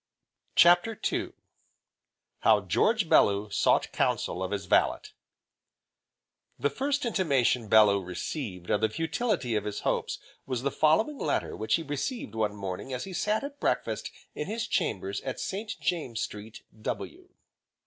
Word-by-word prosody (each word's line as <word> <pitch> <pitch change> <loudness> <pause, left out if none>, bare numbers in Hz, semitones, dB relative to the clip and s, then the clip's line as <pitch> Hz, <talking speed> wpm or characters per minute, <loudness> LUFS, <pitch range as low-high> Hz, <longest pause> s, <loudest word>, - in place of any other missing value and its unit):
CHAPTER 175 +6 +5
II - - -2 1.1
How - - +4
George 220 -5 +2
Bellew 100 -6 +4
sought - - +2
counsel 90 - 0
of 95 - -2
his 100 -1 -3
Valet - - +3 1.5
The 145 - 0
first 280 +1 -1
intimation 135 - +1
Bellew 105 -2 +6
received 90 - -5
of 105 - +2
the 110 - +3
futility 165 - -1
of 105 -1 -1
his 105 - -4
hopes - - -1 0.3
was 130 -2 -2
the 140 - 0
following 220 - +2
letter - - -1
which 110 - +1
he 165 - -2
received 145 - -4
one 105 -2 -1
morning 95 +5 -5
as 125 -1 -3
he 190 - -7
sat 210 +5 0
at 285 0 -7
breakfast - - -1 0.2
in 150 - -4
his 225 +2 -2
chambers 100 -1 -1
in 130 - -5
St. 210 +3 -4
James 150 -10 -2
Street, 105 +1 -6 0.2
W. - - -5
135 Hz, 145 wpm, -28 LUFS, -, 1.5 s, Bellew